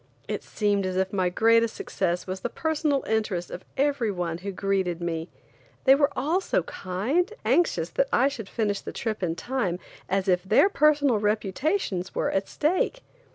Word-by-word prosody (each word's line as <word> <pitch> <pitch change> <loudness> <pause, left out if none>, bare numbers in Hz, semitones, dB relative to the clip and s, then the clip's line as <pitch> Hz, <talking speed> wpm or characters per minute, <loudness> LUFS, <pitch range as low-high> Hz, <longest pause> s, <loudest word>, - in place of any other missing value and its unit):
It - - -3
seemed 205 -2 0
as 185 0 -2
if 190 +1 0
my 185 -2 +1
greatest 230 +4 +3
success 180 -2 -2
was 185 0 -4
the 240 - -3
personal 305 -2 0
interest 210 -6 -1
of 180 - -7
every 275 -5 +1
one 175 -3 -3
who 200 +2 -5
greeted 190 -3 -1
me. 165 -1 -3 0.5
They 265 - +7
were 285 +1 +4
all 315 +8 +1
so - - 0
kind 195 - -3
and 360 +3 +2
as - - -17
anxious 350 - +2
that - - +1
I 270 - +4
should 235 -8 -5
finish 205 -3 -1
the - - -7
trip 220 -3 -3
in 165 -3 -1
time 205 -3 -2 0.3
as 195 0 0
if 180 -1 +3
their 210 - +4
personal 295 - +3
reputations 210 - -1
were - - 0
at 195 0 0
stake. 370 +10 0
210 Hz, 185 wpm, -26 LUFS, 185-280 Hz, 0.5 s, They